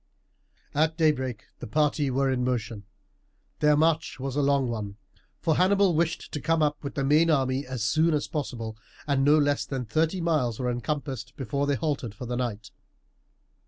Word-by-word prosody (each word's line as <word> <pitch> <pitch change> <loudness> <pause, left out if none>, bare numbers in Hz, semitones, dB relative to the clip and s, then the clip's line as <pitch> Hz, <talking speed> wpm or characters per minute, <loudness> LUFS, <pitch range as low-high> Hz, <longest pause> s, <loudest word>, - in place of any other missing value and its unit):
At 160 +2 +1
daybreak 130 -8 +1
the - - -7
party 150 +3 +1
were 135 +1 +1
in 125 -1 0
motion. 115 -4 -2 0.7
Their 150 -1 +4
march 160 -2 +1
was 135 0 -4
a 145 - +2
long 140 -2 +2
one; 105 -4 -4 0.4
for 160 - +1
Hannibal 195 0 +4
wished 165 +1 -1
to 150 - -4
come 165 -1 +2
up 150 0 -1
with 140 - -5
the 140 - -1
main 150 +4 +4
army 135 -2 +1
as 130 -4 -3
soon 155 +7 +3
as 145 - -1
possible, 120 -8 -4 0.3
and 140 -2 +1
no 145 +2 +5
less 145 -1 +2
than 130 -3 -4
thirty 160 - 0
miles 150 -10 0
were 125 -1 0
encompassed 130 -1 -4
before 140 +1 -1
they 145 - +2
halted 140 -7 -2
for 125 - -7
the 125 +1 -3
night. 120 -4 -3
140 Hz, 180 wpm, -27 LUFS, 125-155 Hz, 0.7 s, no